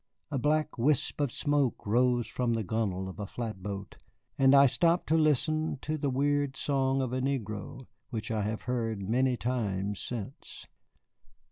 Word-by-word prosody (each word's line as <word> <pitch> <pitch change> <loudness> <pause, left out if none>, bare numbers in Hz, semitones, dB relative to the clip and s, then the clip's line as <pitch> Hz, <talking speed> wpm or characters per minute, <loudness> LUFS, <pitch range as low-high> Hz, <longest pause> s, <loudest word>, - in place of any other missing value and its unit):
A 140 - 0
black 150 0 0
wisp 145 +3 +1
of 140 -4 +1
smoke 145 -4 0
rose 120 +2 +2
from 125 -2 -1
the 110 - -1
gunwale 95 -3 -1
of 95 - -9
a 100 - -4
flatboat, 100 -3 -6 0.4
and 135 0 +5
I 140 0 +8
stopped 170 +6 +2
to 160 - +4
listen 155 0 +2
to 155 - -1
the 145 -2 -1
weird 140 +1 +1
song 135 -1 +1
of 125 -1 -3
a 130 - 0
negro, 125 -2 -3 0.2
which 115 -1 -4
I 110 -1 0
have 105 +2 -3
heard 115 -6 -2
many 125 +3 +2
times 105 -5 -2
since. 120 +2 -7
125 Hz, 160 wpm, -30 LUFS, 110-140 Hz, 0.4 s, I